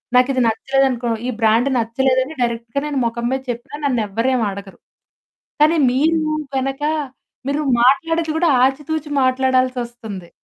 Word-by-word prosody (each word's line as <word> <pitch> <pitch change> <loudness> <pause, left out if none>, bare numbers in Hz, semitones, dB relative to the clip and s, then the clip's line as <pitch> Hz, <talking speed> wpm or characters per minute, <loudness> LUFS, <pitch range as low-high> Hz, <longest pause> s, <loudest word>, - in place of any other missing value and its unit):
నాకిది 255 +1 +3
నచ్చలేదనుకో, 255 +1 0 0.2
ఈ - - -1
బ్రాండ్ 225 +5 +3
నచ్చలేదని 260 +5 0
డైరెక్ట్‌గా 235 +3 -2
నేను 285 -3 -1
మొఖం 235 +1 -2
మీద 265 0 -1
చెప్పినా 240 +5 -8
నన్ను 250 -5 +1
ఎవరు 230 +6 -1
ఏమి 230 -3 +1
అడగరు. 195 0 -10 0.8
కానీ 315 +2 +5
మీరు 315 +4 +2 0.3
గనక, 270 +2 -2 0.7
మీరు 295 +2 -1 0.2
మాట్లాడేది 325 +5 +2
కూడా 340 -1 +2 0.2
ఆచితూచి 295 +2 -2
మాట్లాడాల్సొస్తుంది. 250 -7 -1
260 Hz, 125 wpm, -19 LUFS, 235-280 Hz, 0.8 s, కానీ